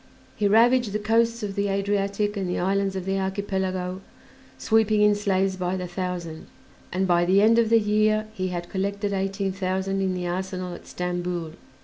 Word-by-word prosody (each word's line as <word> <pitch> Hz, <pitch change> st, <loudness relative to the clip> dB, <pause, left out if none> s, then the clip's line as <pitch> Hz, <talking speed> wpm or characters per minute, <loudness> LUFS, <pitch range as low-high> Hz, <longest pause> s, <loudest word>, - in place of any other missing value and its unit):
He 205 Hz, -, +1 dB
ravaged 230 Hz, +1 st, +4 dB
the -, -, +1 dB
coasts 230 Hz, +2 st, +1 dB
of 200 Hz, -1 st, -3 dB
the 200 Hz, 0 st, -1 dB
Adriatic 200 Hz, +1 st, 0 dB
and 190 Hz, -3 st, -2 dB
the -, -, -1 dB
islands 195 Hz, +1 st, 0 dB
of 185 Hz, -1 st, -4 dB
the 195 Hz, 0 st, 0 dB
Archipelago, 190 Hz, -1 st, -2 dB, 0.6 s
sweeping 220 Hz, -1 st, +3 dB
in 210 Hz, 0 st, +5 dB
slaves 195 Hz, -2 st, 0 dB
by 180 Hz, 0 st, -1 dB
the 180 Hz, -, -4 dB
thousand, 175 Hz, -3 st, -5 dB, 0.4 s
and 190 Hz, +1 st, 0 dB
by 175 Hz, -1 st, +3 dB
the 185 Hz, +3 st, +4 dB
end 225 Hz, +3 st, +5 dB
of 225 Hz, -2 st, +2 dB
the 230 Hz, 0 st, +5 dB
year 215 Hz, 0 st, +2 dB
he 185 Hz, -3 st, -2 dB
had 175 Hz, -1 st, -4 dB
collected 200 Hz, +2 st, -2 dB
eighteen 195 Hz, 0 st, -1 dB
thousand 190 Hz, +1 st, -2 dB
in 190 Hz, -1 st, 0 dB
the 180 Hz, -1 st, -3 dB
arsenal 185 Hz, 0 st, -3 dB
at -, -, -11 dB
Stamboul. 175 Hz, -2 st, -3 dB
195 Hz, 185 wpm, -25 LUFS, 185-205 Hz, 0.6 s, in